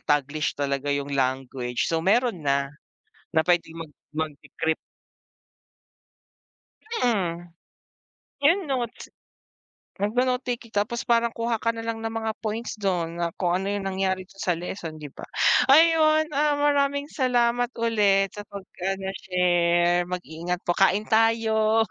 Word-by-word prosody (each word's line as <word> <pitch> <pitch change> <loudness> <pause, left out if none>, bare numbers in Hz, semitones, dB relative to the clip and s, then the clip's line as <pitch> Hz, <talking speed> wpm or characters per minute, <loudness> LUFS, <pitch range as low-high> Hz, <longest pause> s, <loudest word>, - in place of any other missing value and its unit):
Taglish 145 +1 0
talaga 140 0 -2
yung 140 0 -1
language. 130 -2 -1
So, 165 -1 0
meron 215 +2 +2
na, 140 -1 0 0.6
na 160 - +4
pwedeng 175 -2 +1
mag 150 - -18 0.2
mag-decrypt. 160 +1 -2 2.3
Mm. 175 -7 -1 1.0
Yung 340 +7 +5
notes. 245 -4 -3 0.9
Magno-note 250 +5 +1 0.2
taking 230 -2 -17
tapos 210 +4 -1
parang 235 0 +3
kuha 230 -1 -1
ka - - -1
na 230 0 -2
lang 225 0 -3
ng 225 - -2
mga 225 0 -2
points 220 0 -4
dun 175 -4 -1
na 170 - +1
kung 175 -2 0
ano 195 - -3
yung 200 -1 -2
nangyari 190 0 -1
dun 195 +1 -17
sa 180 -2 +1
leson, 170 -2 -6
di 150 -3 -9
ba? - - -11 0.5
Ayun, 310 +1 +5
ah, 295 +1 +2
maraming 285 0 +1
salamat 245 -2 +2
ulit 205 -4 +2
sa 205 - -8
pag-ano, 195 0 -5
share. 175 -1 +2
Mag 180 0 -4
ingat 175 +3 -4
po, 175 - +2
kain 195 +3 +3
tayo. 220 0 +3
195 Hz, 135 wpm, -25 LUFS, 170-230 Hz, 2.3 s, Yung